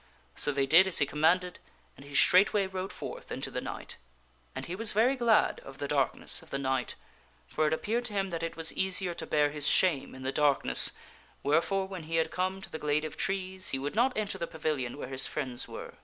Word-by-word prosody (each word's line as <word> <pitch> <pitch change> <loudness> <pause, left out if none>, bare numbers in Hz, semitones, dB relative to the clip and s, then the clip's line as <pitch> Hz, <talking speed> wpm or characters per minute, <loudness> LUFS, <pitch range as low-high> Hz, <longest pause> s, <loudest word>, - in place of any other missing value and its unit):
So 145 - +2
they 140 -1 0
did 165 +7 +6
as 190 - +1
he - - +4
commanded 165 +5 +1 0.4
and 135 - -14
he 140 0 -10
straightway 195 +6 +5
rode 190 0 -5
forth - - -9
into - - -4
the - - -3
night. - - -7 0.6
And - - -5
he 175 - -5
was 220 +2 +2
very 235 +6 +3
glad 235 -4 +2
of 135 0 -12
the 140 - -4
darkness 140 -2 0
of - - -16
the - - -3
night, 130 -2 -2 0.5
for 155 0 0
it - - 0
appeared 230 +9 -2
to 220 - -3
him 195 -2 -2
that 165 - -4
it 165 0 -4
was 165 0 +2
easier 190 -1 +1
to - - -6
bear 150 -1 +2
his 150 0 0
shame 165 -10 +3
in 130 - -10
the 135 - -2
darkness, 145 -1 +3 0.5
wherefore 190 +6 +1
when 185 -4 -8
he 165 - -2
had 160 -1 +1
come 185 +1 -2
to - - -9
the 160 - -6
glade 150 +1 0
of 155 - -7
trees 190 -1 -2
he 135 - -1
would 140 +2 -4
not 250 +3 +1
enter 210 -2 -2
the 170 - -3
pavilion 150 -6 -3
where 145 - -6
his 130 0 +4
friends 130 -5 -2
were. - - -9
165 Hz, 230 wpm, -29 LUFS, 145-190 Hz, 0.6 s, did